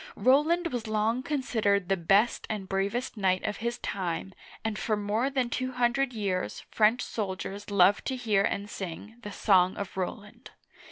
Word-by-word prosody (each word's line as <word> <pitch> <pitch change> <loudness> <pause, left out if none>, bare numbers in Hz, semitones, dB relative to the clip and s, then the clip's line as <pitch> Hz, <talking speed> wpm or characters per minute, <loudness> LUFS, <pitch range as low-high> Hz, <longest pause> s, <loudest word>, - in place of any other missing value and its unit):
Roland 315 +5 +3
was 240 -2 -3
long 220 +3 +1
considered 220 -9 0
the 195 - +2
best 195 +6 +2
and 205 -3 -3
bravest 200 +6 -2
knight 185 -2 +1
of 210 - -2
his 235 +1 -2
time, 190 -1 -3 0.3
and 220 -1 -2
for 215 -2 0
more 210 +5 0
than 260 -3 0
two 255 +2 -3
hundred 250 +2 +1
years 195 -5 -2
French 220 +3 +3
soldiers 200 -1 -4
loved 200 0 +4
to 265 - -1
hear 220 -6 +1
and 200 0 -1
sing 200 +2 -7
" - - -25
The 210 - -7
Song 185 -3 +3
of 200 -2 -5
Roland." 210 +6 -5
210 Hz, 170 wpm, -28 LUFS, 195-240 Hz, 0.3 s, loved